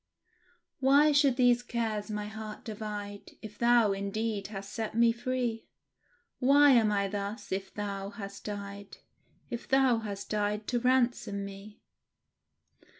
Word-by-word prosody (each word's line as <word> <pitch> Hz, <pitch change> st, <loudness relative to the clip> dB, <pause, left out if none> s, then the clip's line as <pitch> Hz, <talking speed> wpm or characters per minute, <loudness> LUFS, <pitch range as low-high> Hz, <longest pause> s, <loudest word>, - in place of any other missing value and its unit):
"Why 280 Hz, +3 st, +5 dB
should 285 Hz, -3 st, +4 dB
these 245 Hz, -1 st, +4 dB
cares 225 Hz, -3 st, -3 dB
my 210 Hz, -1 st, -3 dB
heart 215 Hz, 0 st, -8 dB
divide, 210 Hz, -2 st, -6 dB
If 210 Hz, -1 st, -10 dB
Thou, 235 Hz, -3 st, +4 dB
indeed, 200 Hz, +1 st, -2 dB
hast 200 Hz, -1 st, -8 dB
set 220 Hz, -1 st, -4 dB
me 235 Hz, 0 st, +5 dB
free? 240 Hz, -1 st, -3 dB, 0.7 s
Why 280 Hz, +2 st, +6 dB
am 225 Hz, -4 st, +4 dB
I 200 Hz, -1 st, +1 dB
thus, 205 Hz, +1 st, -5 dB
if 190 Hz, 0 st, -3 dB
Thou 200 Hz, -1 st, -4 dB
hast 200 Hz, -1 st, -9 dB
died 200 Hz, -1 st, -7 dB, 0.5 s
If 235 Hz, -, -5 dB
Thou 265 Hz, -3 st, +4 dB
hast 200 Hz, -3 st, -6 dB
died 210 Hz, 0 st, -1 dB
to 245 Hz, -, +1 dB
ransom 240 Hz, -5 st, +1 dB
me?" 200 Hz, +2 st, -11 dB
215 Hz, 135 wpm, -30 LUFS, 200-240 Hz, 0.7 s, Why